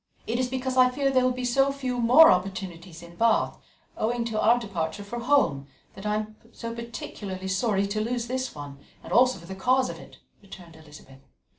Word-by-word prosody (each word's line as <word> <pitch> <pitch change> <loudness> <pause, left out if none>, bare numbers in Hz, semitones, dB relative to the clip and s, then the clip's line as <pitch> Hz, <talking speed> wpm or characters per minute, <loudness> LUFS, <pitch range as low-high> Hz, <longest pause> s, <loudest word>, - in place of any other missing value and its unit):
"It 235 +2 -2
is 255 -1 0
because 260 0 -3
I 255 0 +6
fear 275 +2 0
there 255 -1 +3
will 255 - +3
be 250 0 -4
so 270 +3 +2
few 260 -3 -3
more 250 +8 +7
in 180 -2 -4
Bath, 230 -1 +2 0.4
owing 235 +2 -1
to 220 -2 -2
our 235 +3 +5
departure 195 -5 -4
for 235 +4 -6
home, 235 - +1 0.3
that 195 +2 -7
I 210 - +1
am 215 0 -4
so 230 0 -6
particularly 205 -5 -7
sorry 195 +1 +1
to 215 +1 -1
lose 235 +1 -2
this 255 -2 -3
one, 145 -1 -9 0.2
and - - -7
also 255 -1 +4
for 170 - -13
the 190 - -7
cause 255 +6 +1
of - - -10
it," - - -14 0.2
returned 180 -4 -13
Elizabeth. 150 -4 -15
225 Hz, 195 wpm, -26 LUFS, 190-250 Hz, 0.4 s, more